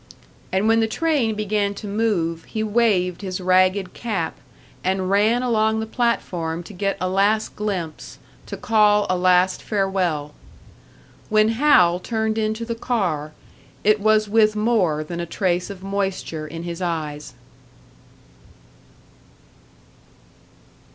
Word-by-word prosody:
And 190 +3 +1
when 225 0 +4
the 225 - +2
train 265 -4 0
began 205 -1 -1
to 210 - -8
move, 195 -6 -1
he 220 - -3
waved 205 -5 +1
his 185 -2 -4
ragged 185 +1 +2
cap, 195 -9 -3 0.5
and 185 0 0
ran 220 +5 +3
along 220 -2 +1
the 220 - -2
platform 180 -8 -2
to 205 - -11
get 195 +1 -2
a 185 - -1
last 200 +3 +1
glimpse, 185 -7 -4 0.3
to - - -6
call 210 -2 +3
a - - +2
last 180 +1 +3
farewell. 185 -8 -1 1.0
When 215 0 +4
Hal 225 -9 +4
turned 220 +1 -2
into 220 +1 -2
the 230 - -3
car, 180 -11 -2 0.5
it 210 +1 +4
was 215 0 +3
with 215 0 +3
more 210 -9 +1
than 170 +2 -6
a 170 - -4
trace 180 0 -1
of 195 -2 -9
moisture 195 -5 -3
in 165 +2 -7
his 170 0 -6
eyes. 155 -4 -4
200 Hz, 130 wpm, -22 LUFS, 180-220 Hz, 1.0 s, when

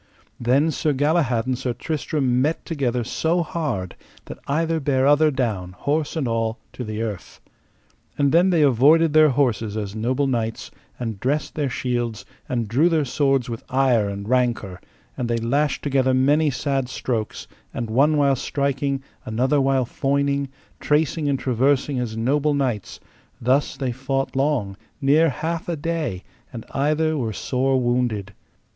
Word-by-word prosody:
Then 135 +7 +2
Sir 150 +1 0
Galahad 140 -5 +1
and 130 0 0
Sir 125 0 -3
Tristram 135 -2 -1
met 155 +4 -1
together 125 -6 -1
so 165 +8 0
hard 135 - -3 0.3
that - - -9
either 165 +3 0
bare 135 -2 +1
other 145 +2 +5
down, 110 -10 -2
horse 150 - -1
and 150 -6 -1
all, 115 0 -1 0.2
to 125 - -6
the 110 0 -4
earth. 105 -6 -6 0.8
And 140 -1 +2
then 175 +3 +4
they 170 -4 +3
avoided 145 +5 +4
their 155 0 +6
horses 120 -6 0
as 100 -2 -4
noble 125 +6 0
knights, 115 -4 -2 0.3
and 115 -5 -4
dressed 145 +6 -1
their 145 -3 -1
shields, 120 -3 -2 0.2
and 120 -3 -1
drew 140 +11 +3
their 160 -3 +1
swords 135 -1 +1
with 115 -2 -6
ire 125 -6 +2
and 100 0 -6
rancour, 120 -7 0 0.3
and 120 -2 -3
they 115 - +1
lashed 140 +5 0
together 130 -2 +2
many 145 +4 +3
sad 135 -1 -1
strokes, 115 -4 -3 0.2
and 120 - -4
one 140 +7 +3
while 140 -2 +3
striking, 140 0 -1 0.2
another 130 +6 +1
while 135 -1 +2
foining, 140 +2 0 0.3
tracing 150 0 +1
and 140 - +1
traversing 130 +2 +1
as 115 -3 -3
noble 145 +5 +1
knights; 125 -7 -2 0.4
thus 130 +4 +1
they 130 -3 -2
fought 135 +2 -2
long, 135 -8 0 0.2
near 150 +3 +4
half 165 +5 -3
a 170 - 0
day, 155 - -3 0.3
and 115 -3 -8
either 155 +3 +1
were 115 -7 -2
sore 130 +4 0
wounded. 120 -5 -1
135 Hz, 155 wpm, -22 LUFS, 120-145 Hz, 0.8 s, their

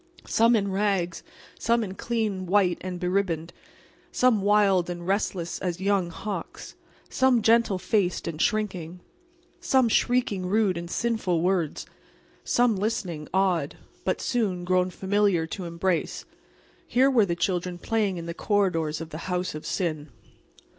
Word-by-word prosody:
Some 230 +1 +4
in 200 -3 0
rags, 190 -4 0 0.4
some 235 0 +2
in 190 -3 -5
clean 210 -4 -2
white 185 -2 +2
and 185 -1 -5
beribboned, 180 -3 -1 0.6
some 250 -5 +3
wild 195 -3 +3
and 175 -1 -5
restless 190 -3 -1
as 180 -2 -3
young 195 -2 +1
hawks, 200 +4 -6 0.3
some 260 -4 +2
gentle 225 -3 +4
faced 185 -2 0
and 165 -1 -4
shrinking, 180 -6 -1 0.6
some 265 -8 +3
shrieking 215 -6 +1
rude 205 -1 +2
and 170 0 -6
sinful 220 -7 0
words, 180 -4 0 0.6
some 240 -4 +2
listening, 185 -7 -3
awed, 185 -6 +1 0.3
but - - -1
soon, 205 -8 -1
grown 180 0 +2
familiar, 190 -2 +1
to 180 +3 -6
embrace—here 185 +8 -2
were 230 -5 +4
the 170 - -1
children 180 0 -1
playing 205 -1 -1
in 170 - -6
the 170 - -4
corridors 170 -6 0
of 165 0 -8
the 160 +4 -7
House 180 0 -1
of 155 - -7
Sin. 155 -5 -2
190 Hz, 140 wpm, -26 LUFS, 175-210 Hz, 0.6 s, Some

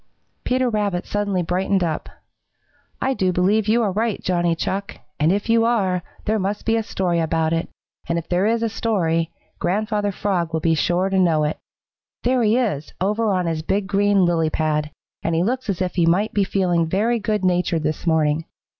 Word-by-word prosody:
Peter 255 0 +1
Rabbit 205 -5 -1
suddenly 200 -3 -1
brightened 185 +2 0
up. 160 -3 -2 0.9
"I 265 - +1
do 185 -7 +1
believe 195 +4 +2
you 230 +2 +3
are 205 - +1
right, 220 +2 -1
Johnny 175 -2 +1
Chuck, 195 +4 -3 0.2
and 155 +3 +3
if 200 +1 -1
you 230 0 +4
are, 195 -6 +1 0.2
there 215 +1 +1
must 200 +2 -2
be 225 - +2
a 225 - +1
story 180 -5 -1
about 160 0 +1
it, 165 0 -1 0.4
and 170 - +1
if 165 -1 -4
there 180 +3 +1
is 230 +1 +1
a - - +2
story, 170 -8 0 0.3
Grandfather 205 +3 0
Frog 180 -4 -1
will 160 - +1
be 165 +1 +2
sure 175 +4 +1
to 190 0 +1
know 165 -4 +3
it. 150 +1 -2 0.6
There 250 +1 +2
he 220 +1 +3
is, 195 - -1
over 210 +4 +1
on 185 -2 0
his 165 -2 -1
big 195 +5 -1
green 200 -1 +3
lily 165 -2 +1
pad, 150 -1 0 0.3
and 165 - -1
he 165 - +2
looks 250 +3 -2
as 190 -1 0
if 180 - -3
he 170 -3 +2
might 195 +6 +2
be 205 - +2
feeling 175 -4 +1
very 220 +7 +1
good 210 -2 -1
natured 175 -3 +1
this 155 +3 -2
morning. 160 -1 +2
185 Hz, 200 wpm, -22 LUFS, 165-210 Hz, 0.9 s, you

